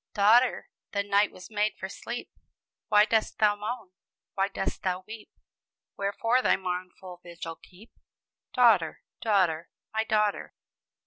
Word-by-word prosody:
"Daughter, 230 Hz, +5 st, +4 dB, 0.3 s
the 200 Hz, -1 st, +1 dB
night 200 Hz, +1 st, +2 dB
was 185 Hz, -, -13 dB
made 210 Hz, -1 st, 0 dB
for 190 Hz, -, -5 dB
sleep; 235 Hz, +4 st, -7 dB, 0.6 s
Why 210 Hz, 0 st, +6 dB
dost 220 Hz, -1 st, 0 dB
thou 210 Hz, -1 st, +4 dB
moan, 210 Hz, -1 st, -5 dB, 0.4 s
why 195 Hz, 0 st, +1 dB
dost 195 Hz, -1 st, -4 dB
thou 185 Hz, -1 st, -1 dB
weep? 220 Hz, 0 st, -10 dB, 0.7 s
Wherefore 225 Hz, +5 st, +1 dB
thy -, -, +4 dB
mournful 180 Hz, -1 st, -6 dB
vigil 170 Hz, -1 st, -8 dB
keep? 195 Hz, +6 st, -18 dB, 0.6 s
Daughter, 225 Hz, -10 st, +3 dB, 0.2 s
daughter, 180 Hz, -7 st, +1 dB, 0.2 s
my 220 Hz, 0 st, +1 dB
daughter!" 210 Hz, -2 st, 0 dB
205 Hz, 130 wpm, -28 LUFS, 185-220 Hz, 0.7 s, Why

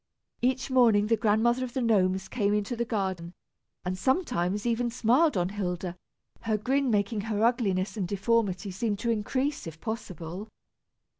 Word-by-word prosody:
Each 255 Hz, +1 st, 0 dB
morning 230 Hz, -5 st, +5 dB
the 225 Hz, +2 st, +3 dB
Grandmother 225 Hz, +3 st, +2 dB
of 245 Hz, -2 st, -5 dB
the 260 Hz, -, 0 dB
Gnomes 190 Hz, -4 st, +2 dB
came 205 Hz, -4 st, 0 dB
into 210 Hz, +4 st, -1 dB
the 235 Hz, 0 st, -1 dB
garden, 190 Hz, -6 st, -3 dB, 0.5 s
and 180 Hz, +1 st, -1 dB
sometimes 210 Hz, -, 0 dB
even 240 Hz, 0 st, +1 dB
smiled 250 Hz, -, +3 dB
on 175 Hz, 0 st, +1 dB
Hilda, 180 Hz, -3 st, -3 dB, 0.5 s
her 220 Hz, -2 st, 0 dB
grin 265 Hz, +5 st, +1 dB
making 210 Hz, 0 st, +1 dB
her 215 Hz, 0 st, 0 dB
ugliness 210 Hz, -6 st, +1 dB
and 190 Hz, -4 st, -1 dB
deformity 200 Hz, -1 st, 0 dB
seem 205 Hz, +3 st, -1 dB
to 230 Hz, +4 st, -1 dB
increase, 255 Hz, -, -1 dB
if 160 Hz, 0 st, -9 dB
possible. 185 Hz, -2 st, -6 dB
215 Hz, 155 wpm, -28 LUFS, 190-240 Hz, 0.5 s, morning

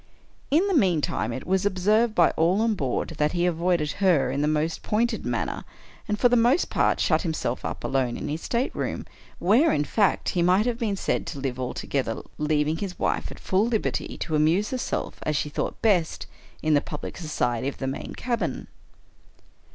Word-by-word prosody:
In 330 Hz, +8 st, +3 dB
the 395 Hz, -, 0 dB
meantime, 185 Hz, -, +1 dB
it 130 Hz, -, -5 dB
was 190 Hz, +1 st, +1 dB
observed 210 Hz, +4 st, +2 dB
by 170 Hz, -, +5 dB
all 175 Hz, +6 st, +2 dB
on 225 Hz, -1 st, +2 dB
board, 135 Hz, -11 st, -2 dB
that 150 Hz, 0 st, +2 dB
he 175 Hz, 0 st, +1 dB
avoided 170 Hz, -3 st, +1 dB
her 155 Hz, -10 st, +3 dB
in 140 Hz, +2 st, -1 dB
the 150 Hz, -, +2 dB
most 155 Hz, +1 st, 0 dB
pointed 235 Hz, +3 st, 0 dB
manner, -, -, -2 dB, 0.4 s
and, 210 Hz, -1 st, -1 dB
for 245 Hz, -, +6 dB
the 245 Hz, -, +3 dB
most 245 Hz, +8 st, +3 dB
part, -, -, +2 dB
shut -, -, +2 dB
himself 160 Hz, -7 st, -2 dB
up -, -, -5 dB
alone 130 Hz, -3 st, 0 dB
in -, -, -5 dB
his 155 Hz, +3 st, -3 dB
stateroom, 245 Hz, +3 st, -2 dB, 0.3 s
where, 230 Hz, -, +4 dB
in 145 Hz, -, +1 dB
fact, 205 Hz, +5 st, +1 dB
he 175 Hz, -, 0 dB
might 185 Hz, +5 st, +4 dB
have 240 Hz, -1 st, -1 dB
been 215 Hz, -5 st, 0 dB
said -, -, -1 dB
to 140 Hz, -, -5 dB
live 130 Hz, -2 st, -3 dB
altogether, 125 Hz, -1 st, -2 dB, 0.2 s
leaving 150 Hz, +1 st, +1 dB
his 185 Hz, 0 st, -5 dB
wife -, -, -1 dB
at -, -, -9 dB
full 195 Hz, +4 st, +1 dB
liberty 225 Hz, -3 st, -2 dB
to 160 Hz, -, -3 dB
amuse 165 Hz, -, +2 dB
herself 255 Hz, -1 st, -3 dB
as 155 Hz, -, -1 dB
she 150 Hz, -, -1 dB
thought -, -, -3 dB
best, 185 Hz, -7 st, +2 dB, 0.4 s
in 155 Hz, 0 st, +3 dB
the 145 Hz, -, +4 dB
public 150 Hz, -, -7 dB
society 130 Hz, -7 st, -1 dB
of 140 Hz, -, -4 dB
the 135 Hz, -, -4 dB
main 135 Hz, +1 st, -5 dB
cabin. 230 Hz, -, -2 dB
175 Hz, 190 wpm, -25 LUFS, 150-215 Hz, 0.4 s, for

